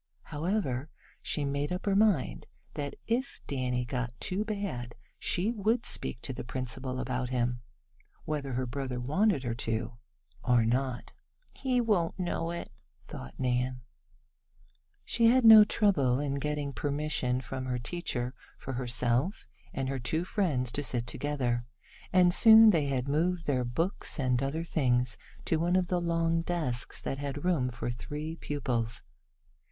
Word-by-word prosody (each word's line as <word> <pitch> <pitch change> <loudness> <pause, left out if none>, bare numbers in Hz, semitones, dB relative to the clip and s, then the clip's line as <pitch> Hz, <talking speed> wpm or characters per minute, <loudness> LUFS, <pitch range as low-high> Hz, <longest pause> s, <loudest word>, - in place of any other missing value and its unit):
However, 150 - -2 0.3
she 150 - -1
made 140 +2 -2
up 180 +1 -3
her 200 -1 +2
mind 200 -10 +2 0.3
that 145 -1 -4
if 245 +4 -1
Danny 125 -2 -1
got 125 -1 -4
too 190 +3 -1
bad 200 - -4 0.2
she 190 +6 +1
would 225 +2 0
speak 120 - -1
to 130 - -2
the - - -6
principal 130 +1 -4
about 125 0 -2
him, 120 -1 -1 0.6
whether 145 -3 -3
her 130 +1 -1
brother 130 0 -4
wanted 155 - +1
her 120 -2 -1
to 115 0 -3 0.4
or 120 -3 +3
not. 125 +1 -1 0.4
"He 255 -2 0
won't 205 -8 +1
know 175 -2 -2
it," 170 0 -5 0.4
thought 65 - -9
Nan. 125 0 0 1.2
She 230 -1 +3
had 250 +1 +5
no 220 -1 +11
trouble 150 - +2
in 140 -1 -1
getting 150 -1 -2
permission 145 -4 -1
from 130 0 -5
her 125 -1 -1
teacher 125 -2 -3 0.2
for 135 - -6
herself 125 - 0 0.3
and 135 0 -3
her 135 0 -2
two 160 +8 -1
friends 150 - 0
to 145 - -2
sit 120 -2 -1
together, 125 -3 -1 0.5
and 180 -1 +5
soon 220 +1 +9
they 155 -6 +1
had 130 -1 -1
moved 165 +4 0
their 130 -3 +1
books 160 +9 -1
and 125 -2 +1
other 140 +4 -1
things 125 -6 +1 0.3
to 160 - +2
one 175 +3 +1
of 185 -1 +1
the 180 -1 +1
long 165 -1 +1
desks 155 -9 -2
that 135 - -3
had 145 +2 -4
room 155 -9 +2
for 120 0 -4
three 150 +6 -5
pupils. 120 -7 -2
140 Hz, 150 wpm, -30 LUFS, 125-175 Hz, 1.2 s, no